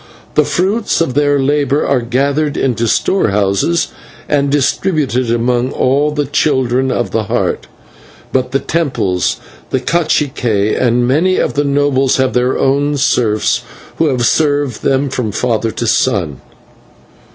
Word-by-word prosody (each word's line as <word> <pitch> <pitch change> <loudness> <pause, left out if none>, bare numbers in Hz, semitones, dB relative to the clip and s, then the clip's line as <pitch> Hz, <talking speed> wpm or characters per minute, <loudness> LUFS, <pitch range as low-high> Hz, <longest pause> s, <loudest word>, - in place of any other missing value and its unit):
The 150 - +3
fruits 205 +5 0
of 165 -6 0
their 145 +1 +2
labour 145 +1 +1
are 135 -3 +1
gathered 140 +5 -1
into 120 -3 0
storehouses 105 - +1 0.4
and 140 -1 +1
distributed 140 -3 0
among 120 +2 0
all 140 +3 +1
the 150 -1 -2
Children 130 -2 +1
of 120 -2 -2
the 110 -1 -1
Heart, - - -2 0.7
but 130 -1 0
the 135 - +2
temples, 100 - -1 0.3
the 130 - 0
/cacique/, 130 -8 0
and 120 -1 +2
many 170 +8 +2
of - - 0
the 145 - 0
nobles 140 -2 +1
have 130 -1 +1
their 125 +1 +1
own 145 +2 +1
serfs 110 -5 +1 0.4
who 160 - +2
have 125 -4 0
served 145 -3 +1
them 135 +1 +1
from 125 -5 -2
father 115 0 -1
to 120 - -4
son." 95 - 0
130 Hz, 140 wpm, -14 LUFS, 120-145 Hz, 0.7 s, The